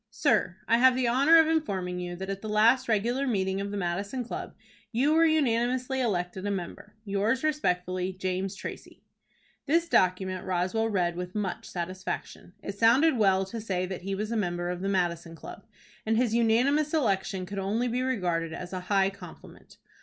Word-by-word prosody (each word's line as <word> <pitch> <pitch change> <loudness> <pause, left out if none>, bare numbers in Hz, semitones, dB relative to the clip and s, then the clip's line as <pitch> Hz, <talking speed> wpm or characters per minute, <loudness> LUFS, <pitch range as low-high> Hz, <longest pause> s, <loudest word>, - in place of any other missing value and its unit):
"Sir: 210 -4 +1
I 230 +1 +4
have 255 0 +6
the 255 -1 +1
honor 275 +7 +5
of 320 - +7
informing 195 - -1
you 175 0 -5
that 190 +2 -6
at 195 0 -5
the 215 - -6
last 230 +5 +4
regular 240 +6 +1
meeting 190 -4 0
of 200 - -4
the 205 - -4
Madison 200 +7 -2
Club 235 - -7 0.4
you 265 +6 +2
were 325 +1 +5
unanimously 255 -3 +1
elected 185 -5 -2
a - - 0
member. 195 +2 -6
"Yours 205 +6 0
respectfully, 185 -11 0
"JAMES 185 +1 -3
TRACY." - - -9 0.6
This 335 +4 +2
document 185 - +1
Roswell 185 +5 0
read 175 -4 0
with 180 +2 -6
much 200 -4 -3
satisfaction. 185 0 -5
It 200 0 -6
sounded 260 +7 +5
well 195 -2 +3
to 225 +4 -6
say 185 -4 -2
that 185 0 -6
he 195 +2 -3
was 210 +3 -3
a - - -1
member 175 -4 -1
of 180 0 -5
the 195 - -1
Madison 170 -3 -1
Club, - - -11 0.4
and 220 0 +1
his 235 -2 +1
unanimous 255 +7 +2
election 195 -8 0
could 200 +2 -5
only 215 +6 0
be 245 +1 -1
regarded 175 -10 -1
as 180 +2 -7
a 185 - -2
high 195 -1 +3
compliment. 200 - -14
200 Hz, 185 wpm, -28 LUFS, 185-240 Hz, 0.6 s, of